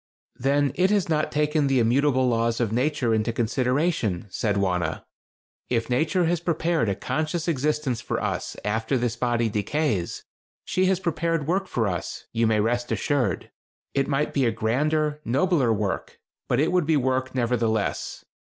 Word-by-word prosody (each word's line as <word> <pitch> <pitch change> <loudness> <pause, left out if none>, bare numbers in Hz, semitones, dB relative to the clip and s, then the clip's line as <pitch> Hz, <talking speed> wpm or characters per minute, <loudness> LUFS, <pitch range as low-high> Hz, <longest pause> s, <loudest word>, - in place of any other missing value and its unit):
"Then 140 +1 +2
it 185 +2 +2
has 200 -4 +1
not 155 -1 +1
taken 150 0 +1
the 135 -1 +2
immutable 130 +2 +3
laws 115 -1 +1
of 115 -4 0
Nature 125 -1 +1
into 110 +1 +1
consideration," 120 - 0
said 105 0 0
Wauna. 90 -4 0 0.7
"If 120 0 -1
Nature 160 +8 +2
has 170 +1 +1
prepared 165 - 0
a 100 - 0
conscious 155 - -2
existence 150 -4 0
for - - -2
us - - -3
after 110 +5 0
this 120 -1 -1
body 120 -1 +1
decays, 105 - -1 0.4
she 185 - +1
has 190 -1 +2
prepared 165 -3 -1
work 190 +5 0
for 115 - 0
us, 90 -4 -4
you 115 0 +2
may 110 -1 +2
rest 120 +3 0
assured. 145 -5 0 0.4
It 135 -1 +1
might 145 +1 0
be 135 -3 +2
a - - +2
grander, 150 +7 0
nobler 140 0 +2
work; 105 -3 -2 0.3
but 125 - +2
it 155 - +2
would 180 -4 +2
be 160 -2 +4
work, 130 -1 0
nevertheless. 115 -3 -1
130 Hz, 160 wpm, -25 LUFS, 115-155 Hz, 0.7 s, be